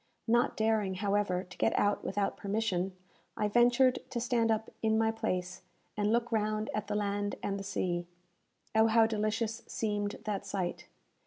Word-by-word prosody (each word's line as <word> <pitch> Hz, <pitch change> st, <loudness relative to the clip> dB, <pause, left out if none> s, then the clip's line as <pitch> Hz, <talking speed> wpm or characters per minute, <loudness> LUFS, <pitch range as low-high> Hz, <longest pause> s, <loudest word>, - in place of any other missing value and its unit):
Not 240 Hz, +1 st, +2 dB
daring, 220 Hz, -3 st, +1 dB
however, 200 Hz, -2 st, 0 dB
to 185 Hz, 0 st, -14 dB
get -, -, +2 dB
out 205 Hz, 0 st, +2 dB
without 200 Hz, -1 st, -1 dB
permission, 195 Hz, -3 st, -1 dB, 0.4 s
I 210 Hz, -, +1 dB
ventured 245 Hz, +4 st, +4 dB
to 240 Hz, -, -2 dB
stand 230 Hz, -1 st, +1 dB
up 220 Hz, 0 st, 0 dB
in 220 Hz, 0 st, +2 dB
my 225 Hz, 0 st, +3 dB
place, 185 Hz, -5 st, -3 dB, 0.3 s
and 210 Hz, 0 st, +1 dB
look 235 Hz, +1 st, +1 dB
round 215 Hz, 0 st, 0 dB
at 215 Hz, -1 st, -2 dB
the 210 Hz, -, -2 dB
land 205 Hz, 0 st, -1 dB
and 200 Hz, 0 st, -1 dB
the -, -, -5 dB
sea. 175 Hz, -3 st, -2 dB, 0.7 s
Oh, 220 Hz, 0 st, +5 dB
how 225 Hz, 0 st, +5 dB
delicious 220 Hz, +1 st, -1 dB
seemed 205 Hz, -2 st, -2 dB
that 205 Hz, -2 st, -2 dB
sight! 195 Hz, -3 st, -3 dB
210 Hz, 165 wpm, -31 LUFS, 200-225 Hz, 0.7 s, Oh